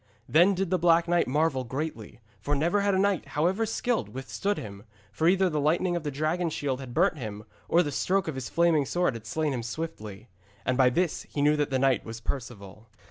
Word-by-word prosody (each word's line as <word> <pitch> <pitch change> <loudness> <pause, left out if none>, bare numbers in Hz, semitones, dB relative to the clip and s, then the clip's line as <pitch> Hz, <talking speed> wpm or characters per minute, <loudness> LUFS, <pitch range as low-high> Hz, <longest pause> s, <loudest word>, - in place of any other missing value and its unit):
Then 175 +5 +5
did 185 -1 -2
the 185 - +2
Black 170 0 +4
Knight 175 0 +2
marvel 145 -1 +1
greatly, 125 -3 -5 0.2
for 145 - -1
never 170 +8 +1
had 200 -1 +2
a - - +2
knight, 195 -2 +1
however 190 +8 +1
skilled, 235 +1 -1
withstood 165 +10 -3
him, 100 -2 -8 0.3
for 160 +11 0
either 190 +1 +4
the 155 -4 -1
lightning 175 +4 +1
of 170 - -1
the 150 - -3
dragon 155 +5 -1
shield 140 -4 -2
had 130 -2 -8
burnt 170 -2 +2
him, 105 -3 -6 0.3
or 175 +1 +4
the 145 - -3
stroke 190 +5 0
of 160 - -2
his 130 -2 -5
flaming 165 -4 +2
sword 175 -5 +1
had 115 -1 -9
slain 155 +1 -1
him 125 - -2
swiftly. 115 -5 -6 0.4
And 130 - +1
by 130 -1 +5
this 170 +5 -1
he 145 - -2
knew 150 +1 +4
that 145 -1 0
this 130 -1 0
knight 130 -4 +2
was 115 0 -7
Perceval. 115 -4 -7
150 Hz, 220 wpm, -27 LUFS, 130-175 Hz, 0.4 s, Then